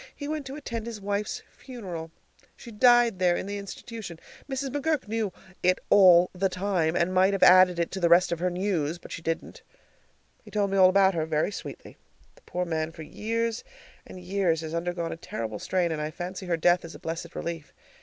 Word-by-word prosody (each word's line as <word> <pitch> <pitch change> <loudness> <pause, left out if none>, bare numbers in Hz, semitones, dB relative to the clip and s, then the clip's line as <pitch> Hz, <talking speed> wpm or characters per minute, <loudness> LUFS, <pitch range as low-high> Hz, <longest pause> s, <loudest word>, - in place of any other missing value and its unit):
He 285 - -6
went 300 -2 -4
to 270 - -6
attend 235 -6 -5
his 230 -3 -6
wife's 205 +1 -3
funeral. 185 -11 -8 0.5
She 235 - -12
died 240 -2 +4
there 180 -1 +3
in - - -4
the 205 +1 -4
institution. 200 -2 -8 0.3
Mrs. 270 0 -2
McGurk 290 -1 -1
knew 220 -2 -1 0.3
it 185 0 +3
all 180 -3 +7
the 190 +1 0
time, 180 -4 0
and 175 +1 +1
might 190 +2 +4
have 195 - +1
added 185 -1 +7
it 170 -1 -1
to 190 - -4
the 170 -2 +2
rest 175 +2 +5
of 170 - -1
her 180 +1 +1
news, 175 -4 -1
but - - -14
she - - -6
didn't. 165 0 -4 0.8
He - - -14
told 205 -2 0
me 195 - +1
all 185 -1 +7
about 195 0 +4
her, 160 -2 -1
very 155 +4 0
sweetly. - - -9 0.4
The - - -23
poor 180 0 -2
man 160 -1 -2
for 160 -1 -10
years 230 +6 -2 0.4
and 185 - -11
years 180 -3 0
has 160 0 -6
undergone 170 0 -2
a - - -5
terrible 110 -8 -5
strain, 180 -3 0
and 155 -1 -2
I 150 - -2
fancy 180 +3 -6
her 170 -1 +1
death 175 +2 +3
is 165 -1 -9
a - - -11
blessed 165 +1 -6
relief. 165 -3 -5
185 Hz, 210 wpm, -27 LUFS, 170-210 Hz, 0.8 s, all